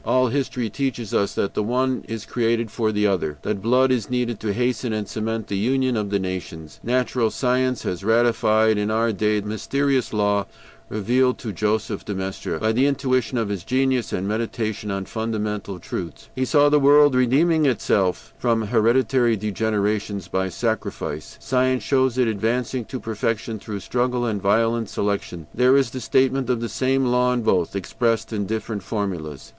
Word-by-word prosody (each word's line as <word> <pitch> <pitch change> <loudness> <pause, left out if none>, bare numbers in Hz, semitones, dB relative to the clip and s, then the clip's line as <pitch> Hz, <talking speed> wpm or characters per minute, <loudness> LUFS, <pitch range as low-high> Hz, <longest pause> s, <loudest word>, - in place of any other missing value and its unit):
All 130 -1 +2
history 125 -3 -1
teaches 120 -3 -3
us 100 - +1
that 100 - -1
the - - 0
one 130 +4 0
is 110 -1 -5
created 115 -2 0
for 110 -2 0
the 105 0 +1
other, 90 -7 0
that 105 -2 -2
blood 125 +4 +3
is 120 -5 0
needed 125 -3 -1
to 110 - -2
hasten 120 +1 -1
and 105 -2 -2
cement 110 0 -3
the 100 - -3
union 130 +3 +1
of 105 -2 -1
the 100 - +1
nations. 90 -5 -6
Natural 125 -1 +1
science 125 0 0
has 90 0 -3
ratified 110 -1 +3
in 105 0 0
our 115 +1 +1
day 105 +1 +1
the 105 - -6
mysterious 135 +4 0
law 105 -1 +1 0.4
revealed 125 +5 +1
to 110 -4 -6
Joseph 105 +1 -1
de 105 - -4
Maistre 95 0 -4
by 110 +1 +1
the 130 +5 +3
intuition 130 -3 0
of 115 -3 -1
his 100 -4 -3
genius 130 -1 0
and 95 +2 -2
by - - -1
meditation 110 -2 -3
on 100 -1 -3
fundamental 105 -3 -3
truths; 85 -2 -7
he 130 - -1
saw 145 +2 +4
the 150 0 +4
world 145 0 +6
redeeming 145 +5 +3
itself 100 -6 0
from 115 -2 +1
hereditary 120 +1 +2
degenerations 105 -1 -1
by 95 0 -1
sacrifice; 110 +5 -3
science 130 +1 +1
shows 130 -2 +1
it 125 -2 +3
advancing 115 +3 -1
to 130 - -6
perfection 110 0 -2
through 105 0 -6
struggle 125 +5 -1
and 105 -4 -2
violent 115 +2 +1
selection; 100 -5 -2
there 125 +3 +4
is 135 -4 +1
the 130 - -5
statement 130 +2 +1
of 125 -2 +1
the 115 0 -3
same 135 0 +1
law 125 0 +2
in 125 -2 0
both, 95 -4 +1
expressed 115 +4 -1
in 100 -2 -2
different 110 -1 -3
formulas. 90 - -4
115 Hz, 180 wpm, -23 LUFS, 105-125 Hz, 0.4 s, world